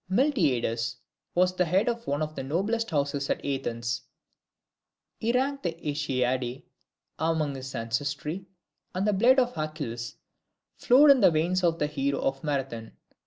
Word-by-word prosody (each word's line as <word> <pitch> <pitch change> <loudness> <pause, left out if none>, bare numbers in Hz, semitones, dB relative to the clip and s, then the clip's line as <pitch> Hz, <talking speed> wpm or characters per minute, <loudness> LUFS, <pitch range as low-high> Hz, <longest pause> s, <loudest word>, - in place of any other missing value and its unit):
Miltiades 130 - +1 0.4
was 180 +1 +3
the 180 - +2
head 185 +6 +2
of 235 -1 -2
one 145 +2 0
of 155 0 -4
the 140 - -5
noblest 200 - -1
houses 140 -2 -1
at - - -1
Athens: 120 -4 -2 1.2
he 225 - +1
ranked 275 +3 0
the 170 -3 -2
AEacidae 130 -5 -2 0.6
among 160 -2 0
his 130 0 -7
ancestry, 140 +10 -3 0.5
and 185 +2 0
the 210 - +2
blood 240 +7 +5
of 250 -1 +2
Achilles 145 -7 -4 0.6
flowed 280 +4 +6
in 265 -3 +5
the 195 - +7
veins 175 +3 +1
of 165 -1 +2
the 150 - +1
hero 140 -2 -1
of 135 0 -1
Marathon. 135 -6 -3
155 Hz, 150 wpm, -27 LUFS, 135-190 Hz, 1.2 s, the